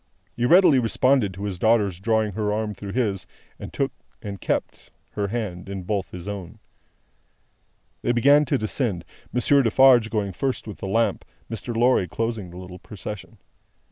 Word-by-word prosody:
He 120 - 0
readily 175 -5 +6
responded 125 -1 +2
to 100 - -7
his 100 -4 -4
daughter's 105 -5 +2
drawing 110 +1 +1
her 105 +1 -1
arm 105 0 -2
through 100 0 -8
his, 105 -7 -1 0.3
and - - -8
took - - -1 0.3
and 100 -2 -7
kept - - -3 0.2
her 100 -1 -2
hand 100 -5 -4
in 95 -1 -5
both 100 0 -2
his 90 +1 -9
own. 100 -4 -6 1.4
They - - +1
began 140 +5 +5
to 140 +1 +1
descend; 110 - -1 0.3
Monsieur 140 +3 +3
Defarge 120 -1 +5
going 105 -3 -2
first 135 +7 -2
with 105 - -8
the - - -5
lamp, 115 +4 +1 0.3
Mr. 115 +1 -4
Lorry 120 -5 +3
closing 115 +2 -3
the 90 - -11
little 90 0 -9
procession. 105 0 -8
110 Hz, 165 wpm, -24 LUFS, 95-120 Hz, 1.4 s, readily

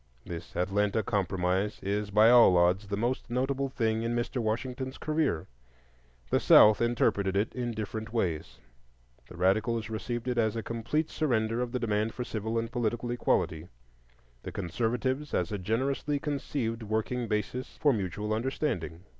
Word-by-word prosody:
This 85 -1 -8
"Atlanta 100 +4 +1
Compromise" 95 +1 0
is 100 +1 -1
by 105 +3 +6
all 120 -7 +7
odds 90 +4 +3
the 100 0 -2
most 120 +3 -1
notable 135 +2 -1
thing 115 -4 0
in 115 +1 -1
Mr. 120 +1 -1
Washington's 125 +4 -3
career. 150 - 0 0.9
The - - +4
South 105 +1 +7
interpreted 100 -5 +1
it 105 +3 0
in 120 -2 -3
different 110 +1 -5
ways: 80 - -2 0.7
the 90 - -11
radicals 110 +5 +1
received 120 +2 -4
it 125 -1 0
as 110 -1 +1
a 115 - -3
complete 120 +7 -2
surrender 115 -6 0
of 125 -1 -2
the 125 - -1
demand 110 -1 -1
for 125 - -3
civil 110 -1 -3
and 115 0 -2
political 120 0 -1
equality; 85 -8 0 0.7
the - - -7
conservatives, 125 +9 -2
as 90 +1 0
a 105 - -2
generously 135 +9 -1
conceived 140 -5 -3
working 110 +3 -2
basis 105 +4 -3
for 145 -2 +4
mutual 105 +1 -2
understanding. 110 - -2
115 Hz, 155 wpm, -29 LUFS, 100-125 Hz, 0.9 s, all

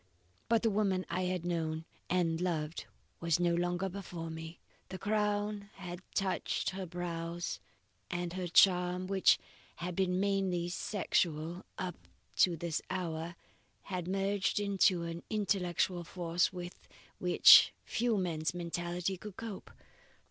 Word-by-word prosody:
"But 230 0 +3
the 225 - +3
woman 195 -3 +1
I 185 +1 0
had 180 -1 -2
known 160 -2 -2 0.2
and 170 -2 +1
loved 165 -3 -2 0.3
was 170 -1 +1
no 175 -1 +3
longer 175 +2 0
before 175 -4 -6
me. 160 +1 -8 0.3
The 190 - -5
crown 210 0 -1
had 180 -2 -7
touched 190 -1 0
her 190 -1 -5
brows, 170 0 -4 0.5
and 175 -1 -3
her 185 -1 -3
charm 180 0 +4
which 190 0 +4 0.4
had 180 +1 -5
been 185 -1 +1
mainly 190 -3 +1
sexual 175 -3 -1
up 180 -2 -5 0.3
to 175 -2 +4
this 165 -1 -2
hour 170 -1 -3 0.5
had 180 -3 -4
merged 195 +2 0
into 195 -3 +3
an 170 0 -5
intellectual 185 -4 0
force, 175 0 0
with 180 -1 -8 0.3
which 180 -1 +8
few 235 -1 +1
men's 165 -3 -1
mentality 175 +2 -2
could 205 0 -9
cope. 225 -4 -7
180 Hz, 130 wpm, -33 LUFS, 170-195 Hz, 0.5 s, which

